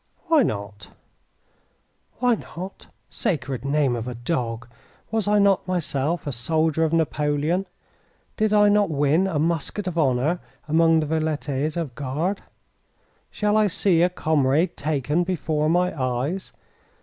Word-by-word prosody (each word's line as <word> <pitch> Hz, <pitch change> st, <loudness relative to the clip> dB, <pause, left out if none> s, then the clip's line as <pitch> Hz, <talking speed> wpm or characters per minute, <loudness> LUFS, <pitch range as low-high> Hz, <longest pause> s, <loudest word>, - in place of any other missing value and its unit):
"Why 320 Hz, -3 st, +5 dB
not?" 100 Hz, -, -3 dB, 1.3 s
"Why 250 Hz, 0 st, +3 dB
not? 190 Hz, -3 st, -7 dB, 0.2 s
Sacred 135 Hz, -6 st, -2 dB
name 140 Hz, -2 st, +1 dB
of 115 Hz, 0 st, -4 dB
a 125 Hz, -, -4 dB
dog, 120 Hz, -2 st, -3 dB, 0.4 s
was 220 Hz, -2 st, 0 dB
I 210 Hz, 0 st, +3 dB
not 200 Hz, -2 st, +3 dB
myself 165 Hz, -3 st, -1 dB
a 145 Hz, -, -2 dB
soldier 160 Hz, +6 st, +1 dB
of 160 Hz, -, +1 dB
Napoleon? 155 Hz, +2 st, 0 dB, 0.7 s
Did 215 Hz, -1 st, +1 dB
I 210 Hz, -1 st, +5 dB
not 205 Hz, -2 st, +3 dB
win 150 Hz, +5 st, +2 dB
a 175 Hz, -5 st, -2 dB
musket 170 Hz, +5 st, -1 dB
of 175 Hz, -2 st, -2 dB
honour 140 Hz, +4 st, +1 dB, 0.3 s
among 165 Hz, +1 st, +4 dB
the -, -, -1 dB
Velites 155 Hz, -1 st, -1 dB
of 165 Hz, -4 st, -2 dB
the -, -, -28 dB
Guard? 155 Hz, +9 st, -2 dB, 0.9 s
Shall 210 Hz, 0 st, 0 dB
I 215 Hz, -1 st, +4 dB
see 175 Hz, -2 st, +2 dB
a 175 Hz, -, +4 dB
comrade 155 Hz, -1 st, +1 dB
taken 150 Hz, +2 st, 0 dB
before 160 Hz, -4 st, -1 dB
my 180 Hz, +1 st, +1 dB
eyes? 130 Hz, +7 st, -2 dB
160 Hz, 140 wpm, -23 LUFS, 140-180 Hz, 1.3 s, Why